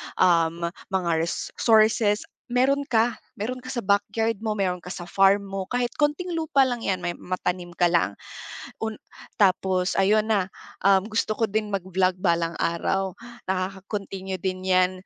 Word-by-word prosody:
um, 170 -1 +3 0.3
mga 185 -3 0
res 165 +1 -2
sources, 215 -2 +4 0.2
meron 265 +3 +2
ka. 235 0 +3 0.3
Meron 250 +5 -3
ka 255 - -9
sa 240 -6 -3
backyard 220 +2 +1
mo, 215 -1 -2
meron 180 -2 0
ka 180 - -9
sa 175 -1 -6
farm 195 +2 +3
mo. 195 -1 -5
Kahit 245 -1 -1
konting 305 +4 0
lupa 310 -4 +3
lang 245 -2 -3
'yan, 185 -2 0
may 175 - 0
matanim 180 -1 -3
ka 175 - +3
lang. 170 - +1 0.7
Un 220 -1 -2 0.4
tapos 185 -2 +2
ayun 210 +2 +4
na, 200 -4 +2 0.4
um, 195 -1 +5
gusto 215 -1 0
ko 225 - +4
din 215 +1 -1
mag-vlog 185 -1 0
balang 170 -2 +1
araw. 190 +3 0 0.4
Nakaka-continue 190 0 -4
din 185 -1 -3
'yan 185 0 +4
195 Hz, 155 wpm, -25 LUFS, 185-220 Hz, 0.7 s, um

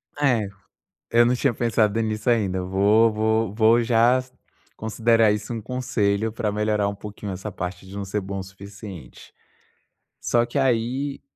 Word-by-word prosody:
É, 125 -8 +1 0.6
eu 120 0 +5
não 125 - +2
tinha 130 +1 +1
pensado 115 -2 +1
nisso 110 +1 -1
ainda. 95 -6 +1
Vou 100 +5 +3
vou 110 -1 0
vou 115 +2 +4
já 120 +2 +3 0.5
considerar 115 0 +2
isso 105 +2 -4
um 115 - -4
conselho 110 -3 -1
para 110 -2 -2
melhorar 105 -1 0
um 100 - -3
pouquinho 105 0 -7
essa 95 +3 -6
parte 90 0 -6
de 95 - -11
não 100 0 -4
ser 100 +2 -2
bom 100 0 -5
o - - -4
suficiente. 95 - -11 0.9
Só 120 0 +2
que 120 - -5
aí 130 +2 0
110 Hz, 160 wpm, -23 LUFS, 100-115 Hz, 0.9 s, eu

